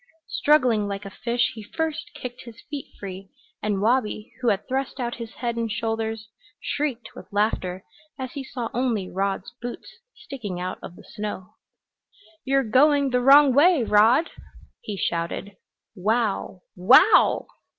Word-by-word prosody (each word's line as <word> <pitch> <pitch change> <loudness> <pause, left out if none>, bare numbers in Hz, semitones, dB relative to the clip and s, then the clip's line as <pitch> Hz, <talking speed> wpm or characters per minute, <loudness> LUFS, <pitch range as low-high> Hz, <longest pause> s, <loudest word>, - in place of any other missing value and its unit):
Struggling 250 -8 +3
like 200 0 -5
a 195 - -7
fish 235 +4 -1
he 220 - -9
first 315 +8 -4
kicked 250 0 -7
his 230 -1 -12
feet 290 -2 -5
free, 195 -1 -8 0.3
and 205 -2 -1
Wabi, 225 -1 0
who 245 - -1
had 200 -2 +1
thrust 265 +1 -2
out 240 -1 -3
his 230 -1 -8
head 235 -2 -3
and 230 -1 -2
shoulders, 225 0 -3 0.3
shrieked 275 -6 -3
with - - -12
laughter 200 -3 -1 0.3
as 260 -2 -5
he 275 - -6
saw 245 -3 -5
only 235 -6 0
Rod's 195 0 -2
boots 245 - -8 0.2
sticking 210 -10 -7
out 185 +1 -4
of 175 - -9
the - - -15
snow. 210 -4 -6 0.9
"You're 270 0 +2
going 275 +4 +3
the 250 0 +2
wrong 275 +1 +7
way, 300 0 +5
Rod!" 225 +9 +4 0.5
he 205 -2 -6
shouted. 170 +4 -3 0.4
"Wow 205 -2 -1
wow!" 250 - +5
230 Hz, 150 wpm, -24 LUFS, 205-260 Hz, 0.9 s, wrong